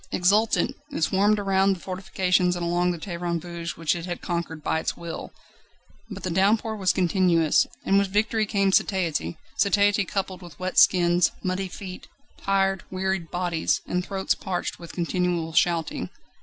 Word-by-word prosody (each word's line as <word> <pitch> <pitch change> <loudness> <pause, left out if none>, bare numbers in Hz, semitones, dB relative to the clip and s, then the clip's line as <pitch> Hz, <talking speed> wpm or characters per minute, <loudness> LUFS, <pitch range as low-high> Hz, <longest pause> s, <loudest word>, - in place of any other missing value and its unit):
Exultant, 210 +5 +2 0.2
it 165 - -2
swarmed 205 +5 +3
around 195 -1 +2
the - - -12
fortifications 185 -1 0
and 175 -1 -3
along 175 +1 +1
the 175 - -1
terrains 170 -1 -3
vagues 170 -1 -6
which 165 0 +1
it 170 +1 -6
had 175 - -4
conquered 170 -3 -4
by 160 - 0
its - - -3
will. 170 -1 -7 0.8
But 200 -2 -8
the 185 - -2
downpour 210 +5 +2
was 190 -3 +2
continuous, 175 -3 +3 0.2
and 195 +1 +4
with 200 - +1
victory 215 +2 +1
came 195 -2 +2
satiety 165 - 0 0.2
satiety 205 0 +3
coupled 190 0 -3
with 170 -4 -12
wet 185 0 +1
skins, 175 -1 +4
muddy 185 +1 -1
feet, 185 0 -9 0.3
tired, 195 -1 +1
wearied 190 -2 -2
bodies, 175 -2 0
and 180 0 -1
throats 190 0 -1
parched 180 -2 -4
with 170 -1 -9
continual 175 -1 -1
shouting. 165 0 +1
185 Hz, 160 wpm, -25 LUFS, 170-195 Hz, 0.8 s, and